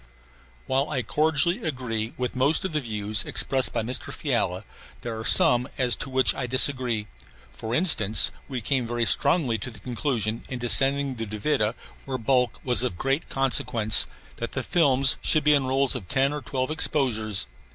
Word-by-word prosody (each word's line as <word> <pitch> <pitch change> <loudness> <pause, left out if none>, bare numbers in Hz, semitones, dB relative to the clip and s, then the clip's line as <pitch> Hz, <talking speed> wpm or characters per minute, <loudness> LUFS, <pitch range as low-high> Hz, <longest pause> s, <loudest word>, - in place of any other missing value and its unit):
While 135 +3 -1
I 130 -5 -2
cordially 160 - 0
agree 120 -7 -4
with 125 0 -4
most 140 +8 +1
of 190 - -3
the 155 - +1
views 105 -2 0
expressed 130 -1 0
by 115 - -2
Mr. 125 +3 -2
Fiala, - - -2 0.4
there 115 -2 -5
are - - -6
some 125 +3 +3
as 125 -3 +3
to - - -6
which 130 0 +3
I 125 - -5
disagree; 125 -3 +1 0.5
for 110 - -5
instance, 110 - +5 0.2
we 130 -3 -5
came 125 +1 -1
very 120 0 -1
strongly 125 -4 +2
to 115 - -6
the 110 - -12
conclusion, 115 -2 -3
in 130 - -4
descending 135 +4 +2
the 115 -1 -5
Duvida, 110 +1 -1 0.3
where 135 -1 -3
bulk 125 0 0
was 125 -2 +3
of 125 -9 -3
great 135 - -2
consequence, 120 -5 +2 0.3
that 115 - -6
the 130 - -3
films 135 -5 +2
should 155 -2 +2
be 150 0 +4
in 140 -3 +1
rolls 135 0 +2
of 90 - -6
ten 135 +1 +1
or 150 - -5
twelve 130 +1 -3
exposures. 115 - 0
130 Hz, 175 wpm, -24 LUFS, 115-140 Hz, 0.5 s, instance